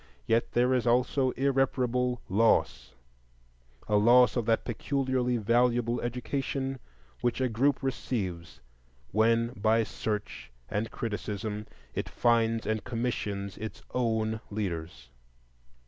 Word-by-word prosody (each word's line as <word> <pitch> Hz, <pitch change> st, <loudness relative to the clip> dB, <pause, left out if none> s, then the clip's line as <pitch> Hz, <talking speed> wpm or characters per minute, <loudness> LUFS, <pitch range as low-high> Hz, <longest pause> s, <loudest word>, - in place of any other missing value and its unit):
Yet 115 Hz, +1 st, +1 dB
there 125 Hz, +2 st, +3 dB
is 125 Hz, -2 st, +1 dB
also 125 Hz, +2 st, +2 dB
irreparable 125 Hz, -2 st, +1 dB
loss,—a -, -, -2 dB
loss 120 Hz, +4 st, +6 dB
of 120 Hz, -3 st, -1 dB
that 115 Hz, -1 st, +2 dB
peculiarly 130 Hz, 0 st, 0 dB
valuable 120 Hz, +2 st, +2 dB
education 135 Hz, +2 st, -3 dB, 0.4 s
which 120 Hz, +1 st, 0 dB
a 130 Hz, -, +2 dB
group 130 Hz, +5 st, +1 dB
receives 90 Hz, -, -3 dB, 0.5 s
when 115 Hz, +2 st, +3 dB
by 110 Hz, 0 st, +2 dB
search 105 Hz, -, -4 dB, 0.2 s
and 105 Hz, -, -2 dB
criticism 105 Hz, -1 st, -4 dB, 0.3 s
it -, -, -3 dB
finds 115 Hz, -1 st, +2 dB
and 110 Hz, -2 st, -1 dB
commissions 105 Hz, -5 st, -3 dB
its 110 Hz, 0 st, -7 dB
own 110 Hz, -2 st, 0 dB
leaders. 85 Hz, -, -5 dB
115 Hz, 105 wpm, -29 LUFS, 105-125 Hz, 0.5 s, loss